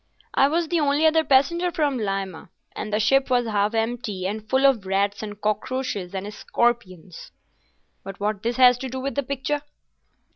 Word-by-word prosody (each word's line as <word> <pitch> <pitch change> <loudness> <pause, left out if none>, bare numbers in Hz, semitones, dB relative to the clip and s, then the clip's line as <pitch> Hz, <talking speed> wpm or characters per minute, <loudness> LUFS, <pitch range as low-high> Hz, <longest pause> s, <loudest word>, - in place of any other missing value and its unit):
"I 275 - +4
was 330 +3 0
the 345 - +1
only 290 +1 +2
other 320 0 +4
passenger 340 +6 +2
from 290 -6 0
Lima, 195 -5 -4 0.3
and 215 - -5
the 210 - +1
ship 270 +5 +3
was 245 -1 +2
half 210 0 0
empty, 225 -4 -2
and 215 +2 -4
full 265 +1 +3
of 265 -7 +4
rats 200 +1 0
and 205 -1 -7
cockroaches 210 -2 -2
and 200 +2 -5
scorpions." 190 -9 -2 0.7
"But 195 0 -9
what 205 0 -2
has 235 +1 -1
this 250 -1 +6
to 265 - -5
do 260 +1 -5
with 275 +1 -3
the 280 - 0
picture?" 280 +2 -3
235 Hz, 180 wpm, -24 LUFS, 205-275 Hz, 0.7 s, this